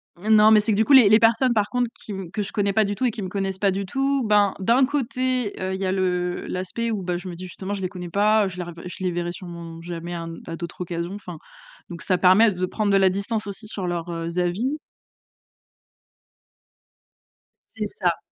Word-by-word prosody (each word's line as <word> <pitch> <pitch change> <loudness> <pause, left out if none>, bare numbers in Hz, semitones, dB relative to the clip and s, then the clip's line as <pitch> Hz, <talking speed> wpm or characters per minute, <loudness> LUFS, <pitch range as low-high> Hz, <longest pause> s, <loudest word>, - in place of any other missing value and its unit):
M 210 +5 +1
non, 215 0 +7
mais 215 - +7
c'est 215 +2 0
que 200 - +1
du 220 - +4
coup 285 - +3
les 245 -7 +9
les 215 - +7
personnes 230 +2 +4
par 210 -2 +1
contre 245 -2 0
qui - - -9
me 190 -3 -6
que 210 - -2
je 195 - -5
connais 200 -1 0
pas 215 0 +3
du 205 0 -2
tout 260 - -1
et 245 - +2
qui 215 - -7
me 190 - -3
connaissent 195 -1 -3
pas 200 - +3
du 195 +1 -2
tout, 270 +5 0
ben, 205 -2 +3
d'un 235 +7 +3
côté, 255 -4 -1
heu, 190 0 -2
il 190 - -6
y - - 0
a 185 - 0
le 180 -2 -1
l'aspect 190 +6 -3
où, 210 -4 -2
bah, 175 -1 -1
je 180 - -8
me 175 - -7
dis: 180 - -9
«Justement 190 +3 -5
je 195 - -6
les 185 - +1
connais 180 -2 -7
pas, 210 +3 +3
heu, - - -2
je 180 - -10
les 180 - -3
revé 170 -1 -9
je 185 - -8
les 180 - +1
verrai 175 0 -2
surement 170 -3 -9
jamais 175 0 -6
à 165 - -4
un 165 - -7
à 165 - -4
d'autres 170 +1 -7
occasions», 170 +1 -4
enfin 180 -5 -8 0.5
donc 170 -1 -7
ça 185 -2 +1
permet 200 +5 +6
de 185 0 -2
prendre 205 +2 -1
de 195 - +5
la 190 -1 +5
distance 205 +3 -3
aussi 205 +2 -8
sur 200 -3 -5
leurs, 175 0 -3
heu, 165 0 -4
avis. 205 +12 -1 3.0
C'est 215 -1 -2 0.2
ça! 175 -2 +2
195 Hz, 250 wpm, -23 LUFS, 180-215 Hz, 3.0 s, les